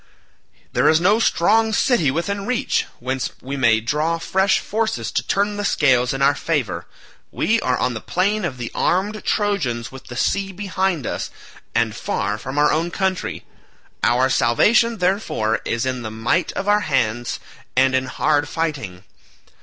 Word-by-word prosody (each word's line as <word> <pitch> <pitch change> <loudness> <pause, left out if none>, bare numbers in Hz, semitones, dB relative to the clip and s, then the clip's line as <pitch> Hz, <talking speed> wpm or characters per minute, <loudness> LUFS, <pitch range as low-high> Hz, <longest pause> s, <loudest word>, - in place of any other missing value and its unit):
There - - +4
is 160 - +4
no 200 +6 +3
strong 220 +2 +3
city 225 - +3
within 200 +8 -2
reach, 250 -1 0
whence 130 +1 -2
we 135 +2 -5
may 115 -5 +3
draw 150 +8 0
fresh 190 +4 +2
forces 220 +1 -2
to - - 0
turn 205 +1 0
the 205 - -2
scales 125 -9 +3
in 135 0 -1
our 140 - +5
favour. 145 - -2 0.4
We 230 +1 +1
are 125 -1 +1
on 125 - 0
the 110 - -5
plain 205 +4 0
of 140 -7 -3
the 120 -1 -5
armed 205 +4 0
Trojans 160 - -1
with 130 0 -11
the 120 - -9
sea 195 +9 0
behind 190 - -1
us, - - -3 0.5
and 115 -2 +1
far 105 0 -2
from 130 +5 -6
our 150 0 +4
own 165 +3 0
country. 190 +1 -2 0.6
Our 125 +2 +3
salvation, 225 - +3
therefore, 180 - 0
is 115 +2 -1
in 130 -1 -2
the 110 - -5
might 115 +10 0
of 195 - -4
our 205 0 +4
hands 120 - -1 0.4
and 130 +1 +4
in 130 0 +1
hard 145 +2 +1
fighting." 135 - -3
150 Hz, 165 wpm, -21 LUFS, 125-200 Hz, 0.6 s, our